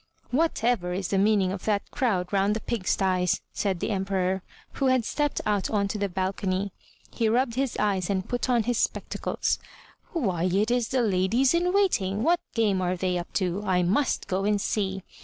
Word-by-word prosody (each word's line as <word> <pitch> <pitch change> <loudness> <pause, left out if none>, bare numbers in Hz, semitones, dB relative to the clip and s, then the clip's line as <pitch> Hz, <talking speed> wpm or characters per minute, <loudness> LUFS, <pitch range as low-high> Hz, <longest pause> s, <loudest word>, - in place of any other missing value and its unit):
''Whatever 240 - +1
is 190 -2 -3
the 195 - +2
meaning 200 -2 +3
of 190 -1 -6
that 205 -2 0
crowd 195 -8 0
round 200 +1 +2
the - - -1
pig 220 -5 -4
sties?*' 185 -2 +2
said 195 -4 -1
the - - -2
Emperor, 190 -1 0 0.3
who 270 - 0
had 255 -3 +3
stepped 295 +2 -1
out 205 -2 0
on 205 -2 +1
to 210 - -3
the 200 -1 0
balcony. 190 +1 -1 0.4
He 225 -2 +1
rubbed 240 +1 +2
his 265 -1 -1
eyes 195 -4 0
and 190 -2 -1
put 245 +1 -2
on 240 -2 +3
his 240 +1 0
spectacles. - - -1 0.5
"Why 190 - 0
it 200 +5 +1
is 245 -2 +1
the 260 -2 +1
ladies 215 - +2
in 350 +1 +2
waiting! 220 - +1
What 345 +2 +3 0.2
game 205 -5 +2
are 180 0 0
they 180 0 0
up 175 - -7
to? 185 0 0
I 185 -3 +2
must 215 +10 +1
go 190 +1 -1
and 205 0 +2
see!" 195 -2 -1
200 Hz, 195 wpm, -26 LUFS, 185-235 Hz, 0.5 s, meaning